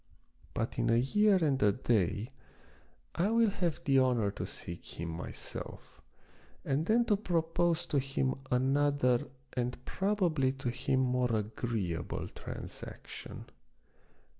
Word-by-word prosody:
But -, -, -2 dB
in -, -, +2 dB
a 115 Hz, -, +5 dB
year 205 Hz, -, +4 dB
and 140 Hz, -3 st, +2 dB
a 105 Hz, -, +6 dB
day 110 Hz, +1 st, 0 dB, 0.8 s
I 185 Hz, +5 st, +1 dB
will 230 Hz, -1 st, +4 dB
have 175 Hz, -5 st, -1 dB
the 135 Hz, -2 st, +4 dB
honor 120 Hz, -6 st, +3 dB
to -, -, -5 dB
seek 85 Hz, 0 st, -8 dB
him 85 Hz, 0 st, -3 dB
myself, 80 Hz, +1 st, -7 dB, 0.6 s
and 145 Hz, +5 st, 0 dB
then 235 Hz, +2 st, +4 dB
to 210 Hz, -, +3 dB
propose 170 Hz, -3 st, +1 dB
to 145 Hz, -, +1 dB
him 135 Hz, 0 st, 0 dB, 0.2 s
another 135 Hz, -1 st, +2 dB, 0.3 s
and 125 Hz, 0 st, -2 dB
probably 180 Hz, -9 st, +1 dB
to 135 Hz, -2 st, -3 dB
him 130 Hz, +2 st, +1 dB
more 125 Hz, -1 st, +2 dB
agreeable 105 Hz, -5 st, -2 dB
transaction. -, -, -8 dB
130 Hz, 125 wpm, -32 LUFS, 120-165 Hz, 0.8 s, a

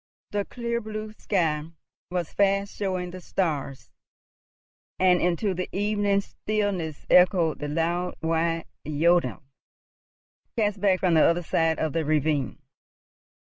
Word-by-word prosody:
The 205 Hz, -1 st, -1 dB
clear 235 Hz, -1 st, -3 dB
blue 215 Hz, 0 st, -6 dB
sky 165 Hz, -7 st, +1 dB, 0.5 s
was 175 Hz, -2 st, -3 dB
fast 200 Hz, 0 st, +1 dB
showing 185 Hz, -3 st, -2 dB
the 185 Hz, 0 st, -8 dB
stars, 145 Hz, -8 st, -3 dB, 1.1 s
and 180 Hz, -1 st, +4 dB
into 180 Hz, +3 st, +1 dB
the 180 Hz, 0 st, -4 dB
evening 205 Hz, 0 st, +1 dB
stillness 200 Hz, -8 st, -3 dB
echoed 180 Hz, -3 st, +4 dB
the 150 Hz, -, -3 dB
loud 170 Hz, +4 st, -1 dB
wide 165 Hz, 0 st, 0 dB, 0.2 s
jodeln, 165 Hz, +2 st, +2 dB, 1.1 s
cast 205 Hz, -3 st, 0 dB
back 190 Hz, -2 st, +3 dB
from 180 Hz, -3 st, +3 dB
the 160 Hz, -, +6 dB
other 175 Hz, +1 st, +3 dB
side 165 Hz, 0 st, +1 dB
of 160 Hz, -2 st, -1 dB
the 165 Hz, -1 st, 0 dB
ravine. 150 Hz, -2 st, 0 dB
180 Hz, 125 wpm, -26 LUFS, 160-200 Hz, 1.1 s, the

